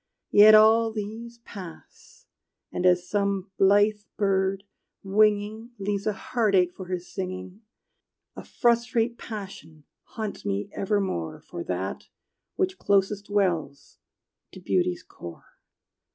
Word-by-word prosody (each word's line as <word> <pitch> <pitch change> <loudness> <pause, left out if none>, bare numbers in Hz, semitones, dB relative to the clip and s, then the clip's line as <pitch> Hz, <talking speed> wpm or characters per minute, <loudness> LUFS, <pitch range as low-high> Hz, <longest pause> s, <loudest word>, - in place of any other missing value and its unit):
Yet 215 +1 +9
all 225 +1 +6
these 220 +2 -6
pass, 205 - -12 0.5
and 180 - +1
as 180 0 +3
some 200 -1 -1
blithe 205 +2 +4 0.2
bird, 195 -1 +1 0.4
winging, 210 +3 +1
Leaves 200 0 -2
a 215 - +1
heart 215 -1 0
ache 180 -1 +3
for 185 - -9
his 180 -1 -5
singing, 185 +1 -6 0.7
A - - -8
frustrate 235 0 +1
passion 195 -8 -9 0.3
haunts 215 -2 -4
me 100 +1 -2
evermore 195 - -2
For 85 - -8
that 95 +2 -4 0.5
which 375 0 -1
closest 200 0 +1
dwells 180 -9 -1 0.5
to - - -10
beauty's 180 0 0
core. 85 -1 -12
200 Hz, 115 wpm, -26 LUFS, 185-215 Hz, 0.7 s, Yet